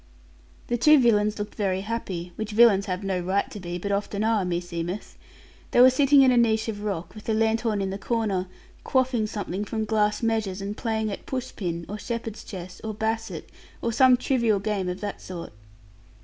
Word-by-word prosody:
The 240 - -1
two 305 +5 +7
villains 210 -4 +3
looked 205 0 -5
very 190 -3 -1
happy 190 -5 -4
which 220 -1 -5
villains 210 -3 +5
have 185 +1 -3
no 190 -2 -1
right 190 +3 0
to 210 - -7
be, 175 -1 -5
but 200 +3 -4
often 200 +1 -1
are, 220 -2 +2
meseemeth 175 +1 -4 0.5
they - - +2
were 255 +1 +9
sitting 275 +1 +5
in 260 - +5
a 245 - +3
niche 220 -2 +3
of 210 -2 -4
rock, 180 -4 -4
with 215 - -11
the 220 - 0
lanthorn 220 -1 +1
in 190 - -2
the 195 - -5
corner, 205 -5 -1 0.4
quaffing 255 -4 +1
something 205 -2 -4
from 220 +1 -3
glass 210 0 +1
measures, 220 -4 0
and 200 +1 -4
playing 220 -2 -1
at - - -7
push 255 -2 -4
pin, 170 -3 -3
or 210 +2 -6
shepherd's 230 -1 -5
chess, 180 -2 -9
or 220 -1 -4
basset; 220 +1 -3 0.3
or 235 - -2
some 255 +1 +6
trivial 235 -5 +1
game 200 -2 -2
of 180 - -5
that 205 -1 -5
sort. 175 - -8
210 Hz, 195 wpm, -25 LUFS, 190-230 Hz, 0.5 s, were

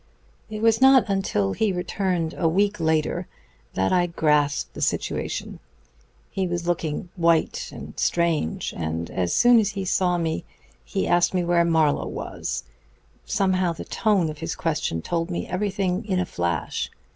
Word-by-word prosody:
"It 215 0 -5
was 225 +1 +4
not 265 -2 +7
until 105 - 0
he 220 -2 +1
returned 180 -2 -1
a 165 - +1
week 200 +4 +1
later 160 -1 0 0.5
that 95 0 +1
I 175 -1 +3
grasped 150 -4 +1
the - - -8
situation. - - -2 0.7
He 190 -1 -1
was 175 -1 -3
looking 170 -1 -2
white 170 -2 +1
and - - -9
strange, 170 - 0
and 80 0 -3
as 90 -2 -1
soon 245 -1 +6
as 205 -2 0
he 195 -1 -3
saw 180 -1 +1
me 160 - -2 0.4
he - - -2
asked 175 +1 +3
me 180 - +2
where 170 0 +3
Mr. 170 - 0
Marlowe 160 -3 +2
was. - - -4 0.6
Somehow 185 -3 +1
the 160 - -8
tone 195 -8 +1
of 150 - -11
his 165 +1 -3
question 150 - -2
told 165 0 -2
me 175 - -3
everything 190 +1 -1
in 190 -3 0
a 180 - 0
flash. 85 - -2
175 Hz, 160 wpm, -24 LUFS, 160-190 Hz, 0.7 s, not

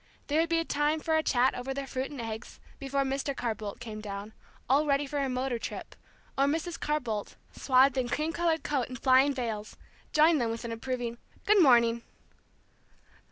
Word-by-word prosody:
There 300 +2 +1
would 330 - -1
be 330 0 +1
time 295 +1 +1
for 320 +1 0
a 315 - +3
chat 255 -3 +2
over 265 +2 -4
their 275 0 -3
fruit 265 0 -3
and 285 - -8
eggs 225 -1 -6 0.2
before 275 0 -1
Mr. 275 +1 -2
Carr 235 -2 -1
Bolt 210 -1 -7
came 215 -3 -7
down, 205 +1 -6 0.3
all 285 +4 +3
ready 280 0 +2
for 285 +1 -3
a 275 -1 0
motor 255 -1 -1
trip, - - -7 0.4
or 275 - +3
Mrs. 325 +4 -2
Carr 300 0 0
Bolt, 220 -6 -4 0.2
swathed 265 0 +3
in 245 -1 -1
cream 310 +5 -1
colored 335 -2 0
coat 275 -5 -1
and 255 - -6
flying 260 +3 +4
veils, 220 -4 -4 0.3
joined 310 -1 +5
them 235 - 0
with 230 +1 -4
an 230 - -4
approving 240 0 -4 0.3
"Good 415 -1 +5
morning." 235 -5 +5
265 Hz, 195 wpm, -29 LUFS, 235-295 Hz, 0.4 s, joined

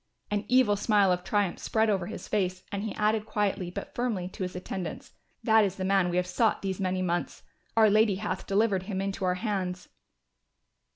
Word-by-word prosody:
An 205 0 -1
evil 250 -4 +4
smile 205 -2 +3
of 180 0 0
triumph 205 -3 0
spread 220 0 +1
over 190 -5 0
his 220 - -7
face 185 -3 -1
and 200 -1 -2
he 220 - -4
added 215 0 +1
quietly 200 -3 -1
but 175 - -7
firmly 225 -7 -1
to 190 - -11
his 180 -1 -3
attendants, 180 0 -5 0.3
"That 220 -2 +5
is 195 -2 -1
the 185 - -3
man 190 -2 +3
we 175 - -1
have 180 - +2
sought 205 +5 +1
these 190 -1 -2
many 185 -1 0
months, 175 -1 -2 0.3
our 220 -1 +7
Lady 215 -1 +4
hath 190 -1 -4
delivered 200 -1 +2
him 190 -2 -2
into 195 0 -3
our 180 0 +2
hands." 185 -3 -3
195 Hz, 195 wpm, -28 LUFS, 185-215 Hz, 0.3 s, our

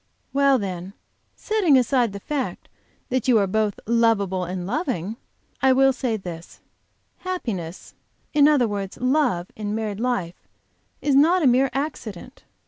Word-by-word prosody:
"Well, 275 -1 +4
then, 190 -3 -5 0.4
setting 395 -10 +2
aside 250 -2 +2
the 200 - -7
fact 280 +5 -4 0.4
that 255 -1 -1
you 245 -3 +5
are 200 - +3
both 210 +1 -1
lovable 210 -5 +2
and 180 0 -4
loving, 220 - -2 0.5
I 265 0 +5
will 270 +1 +4
say 250 -4 -2
this: 175 -4 -9 0.6
Happiness, 210 - -5 0.4
in 295 -1 +6
other 285 -6 +4
words 200 -2 -4
love, 255 - +1
in 210 -1 -3
married 215 -2 -3
life 230 -8 -3 0.6
is 290 - +2
not 325 +6 +4
a - - +3
mere 260 +2 +4
accident. 260 - -6
235 Hz, 140 wpm, -23 LUFS, 195-270 Hz, 0.6 s, in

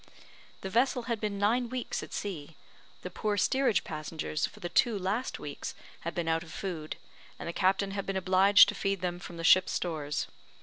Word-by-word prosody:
The 190 - -4
vessel 245 +2 +2
had 230 -3 -2
been 210 -2 -2
nine 230 +4 +2
weeks 255 0 -3
at - - -9
sea; 165 -6 -5 0.5
the 180 - -5
poor 210 +3 -1
steerage 260 +2 +2
passengers 155 0 -3
for - - -15
the 175 - -4
two 225 +4 +3
last 200 +7 -2
weeks - - -6 0.2
had - - -5
been 170 -2 -2
out 165 0 +2
of 165 -1 -11
food, 160 -4 -4 0.4
and - - -7
the 170 - -3
captain 195 +2 +2
had 200 0 -4
been 195 -1 -1
obliged 190 +2 +6
to - - -2
feed 195 -2 -1
them 175 -1 -2
from 175 -1 -9
the 165 - -5
ship's 185 +3 +6
stores. 150 -4 -2
190 Hz, 200 wpm, -30 LUFS, 170-210 Hz, 0.5 s, obliged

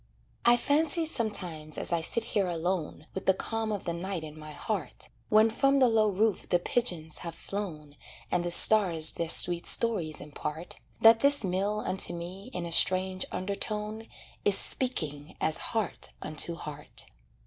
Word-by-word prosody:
I 240 0 +5
fancy 310 +5 +1
sometimes 180 - -2
as - - -1
I 170 - -1
sit 225 +7 +2
here 205 -4 -2
alone 170 -2 -4
With 190 - -8
the 190 - +3
calm 225 +2 -4
of 205 -3 -5
the 170 - -4
night 175 0 -6
in 155 -1 -10
my 155 0 -12
heart, 185 +4 -4 0.2
When 215 +1 +4
from 275 +4 +1
the 260 -2 +3
low 220 -2 +1
roof 205 +1 -2
the 175 - +2
pigeons 175 -5 -3
have 170 -1 -8
flown, 155 -8 -8 0.4
And 175 - -1
the 175 - -3
stars 175 -4 +8
their 165 -1 -5
sweet 175 0 +6
stories 185 -10 +3
impart, 150 +3 -8 0.2
That 225 0 +6
this 280 0 +3
mill 200 +3 -3
unto 190 -2 -1
me 185 +6 -10
in 180 -6 -6
a 170 - -8
strange 185 +2 +2
undertone 210 +3 -6 0.4
Is 205 - +4
speaking 155 - -3
as 160 - 0
heart 220 -5 -4
unto 155 +2 -1
heart. 150 -2 -7
185 Hz, 165 wpm, -27 LUFS, 165-220 Hz, 0.4 s, stars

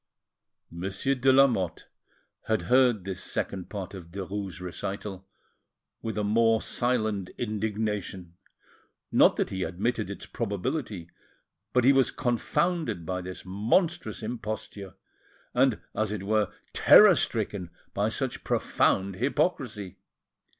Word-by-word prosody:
Monsieur 95 +9 -1
de 130 0 +3
Lamotte 125 -11 +3 0.6
had 110 -1 +1
heard 125 -5 +4
this 95 -1 -5
second 95 -3 -3
part 100 -1 -6
of 90 -4 -9
Derues' 95 0 -5
recital 95 +2 -6 0.7
with 110 -1 -4
a 105 - 0
more 115 +2 +3
silent 110 -7 -1
indignation, 105 -5 -3 0.8
not - - +6
that - - -1
he 95 - -3
admitted 105 +4 -1
its 100 - -7
probability, 105 - -3 0.6
but 125 - +3
he 135 +3 +6
was 135 -1 +4
confounded 120 - -1
by 90 +2 -2
this 90 0 -8
monstrous 110 - 0
imposture, 110 -4 -5 0.6
and, - - +3
as 110 0 -1
it 105 -3 -4
were, 105 +1 +1 0.2
terror 210 -2 +8
stricken 105 - -1 0.2
by - - +1
such - - -3
profound 95 -1 +1
hypocrisy. 125 - -1
105 Hz, 115 wpm, -28 LUFS, 95-120 Hz, 0.8 s, terror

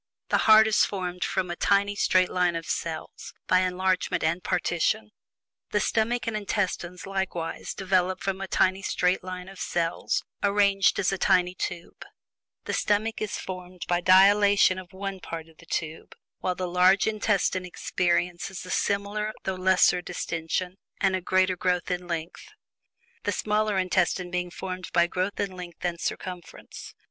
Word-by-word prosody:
The - - +3
heart 220 0 +9
is 220 -1 +3
formed 180 -2 -3
from 180 -2 -1
a - - -3
tiny 200 +3 +2
straight 185 -2 +3
line 180 -2 +1
of 165 0 -4
cells, 165 -1 -5
by 185 - +4
enlargement 185 0 0
and 165 +3 0
partition. 170 - 0 0.6
The 210 - +1
stomach 230 +3 0
and 230 - -2
intestines, 190 -4 -2
likewise, 190 -4 -3
develop 185 -1 +1
from 195 0 -3
a 195 - -4
tiny 190 +1 +2
straight 180 -1 0
line 185 0 -6
of 195 -1 -12
cells 170 0 -1 0.2
arranged 200 -1 +3
as 185 - +1
a 195 - -2
tiny 180 -1 +3
tube 175 -1 -6 0.6
the - - -3
stomach 215 +2 0
is 215 - -2
formed 180 -1 -7
by 175 0 +1
dilation 200 +1 +5
of 180 -1 -12
one 195 0 -5
part 165 -2 -7
of 160 -1 -21
the 165 - -17
tube, 160 0 -4 0.2
while 180 - -1
the 185 0 -3
large 180 +2 +4
intestine 205 -3 0
experiences 180 +1 -1
a 185 - -7
similar 205 +1 -1
though 190 - -1
lesser 185 -1 +3
distention 175 +1 -3 0.2
and 195 -1 +2
a 185 - -2
greater 185 +1 +2
growth 180 0 -1
in 180 0 -3
length; 170 - -5 0.7
the - - -1
smaller 210 -1 0
intestines 185 -1 +1
being 180 0 -2
formed 185 0 -6
by 170 0 +5
growth 185 +3 -3
in 200 -1 -1
length 180 -1 -8
and 170 -1 -2
circumference. 180 -2 -6
185 Hz, 160 wpm, -26 LUFS, 180-195 Hz, 0.7 s, heart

